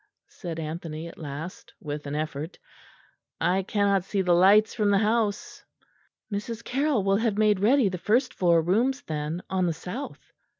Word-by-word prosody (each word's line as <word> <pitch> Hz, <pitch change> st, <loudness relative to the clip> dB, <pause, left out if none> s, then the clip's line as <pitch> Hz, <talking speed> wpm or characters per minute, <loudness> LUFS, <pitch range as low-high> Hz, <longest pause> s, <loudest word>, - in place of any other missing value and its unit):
said 170 Hz, -4 st, -7 dB
Anthony 160 Hz, 0 st, -5 dB
at 170 Hz, -, -12 dB
last, 155 Hz, +3 st, -7 dB
with 145 Hz, -1 st, -6 dB
an 140 Hz, -, -3 dB
effort; 155 Hz, +2 st, -4 dB, 0.8 s
"I 185 Hz, +2 st, +2 dB
cannot 200 Hz, -1 st, +1 dB
see 195 Hz, 0 st, -1 dB
the 180 Hz, -1 st, +3 dB
lights 200 Hz, +5 st, +5 dB
from 210 Hz, -2 st, +1 dB
the 200 Hz, -, +4 dB
house." 215 Hz, 0 st, 0 dB, 0.7 s
"Mrs. 225 Hz, +3 st, -4 dB
Carroll 270 Hz, -4 st, 0 dB
will 195 Hz, 0 st, +3 dB
have 220 Hz, -2 st, 0 dB
made 210 Hz, -2 st, +3 dB
ready 240 Hz, +4 st, +4 dB
the 185 Hz, -2 st, -3 dB
first 245 Hz, +7 st, +1 dB
floor 170 Hz, -3 st, +3 dB
rooms 240 Hz, -, +1 dB
then, 155 Hz, +3 st, -4 dB
on 185 Hz, -1 st, 0 dB
the 170 Hz, -, 0 dB
south." 180 Hz, -, -8 dB
190 Hz, 165 wpm, -26 LUFS, 165-215 Hz, 0.8 s, lights